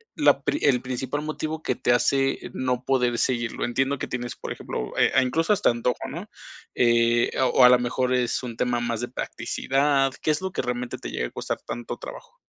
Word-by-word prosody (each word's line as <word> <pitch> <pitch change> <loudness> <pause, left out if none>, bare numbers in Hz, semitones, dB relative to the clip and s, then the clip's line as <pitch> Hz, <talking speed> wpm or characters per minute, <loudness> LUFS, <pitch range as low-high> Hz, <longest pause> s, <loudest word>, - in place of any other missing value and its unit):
la - - +3
pri 300 - 0
el 125 -3 +3
principal 130 +3 -3
motivo 155 +1 -4
que 130 - 0
te 125 0 +1
hace 135 +2 +2
no 125 -1 -1
poder 125 -3 +1
seguirlo? 120 -2 -1
Entiendo 135 +4 0
que - - -4
tienes, 120 -1 -4
por - - -7
ejemplo, - - -5
eh, - - +4
a 130 - +5
incluso 165 +10 +1
hasta 205 - +3
antojo, 120 +1 -2
¿no?, - - -7 0.5
eh, 120 0 +3 0.2
o 130 - +6
a 125 - +10
lo 125 0 +6
mejor 125 +1 0
es 125 0 0
un 120 -2 -5
tema 125 -1 0
más 120 -1 -2
de 120 - -2
practicidad. 135 +2 0
¿Qué 155 - +2
es 150 - -1
lo 190 0 -3
que - - -2
realmente 125 0 -3
te - - -7
llega 60 - -2
a - - -14
costar - - -4
tanto 120 -1 -5
trabajo? - - -10
125 Hz, 210 wpm, -25 LUFS, 120-135 Hz, 0.5 s, a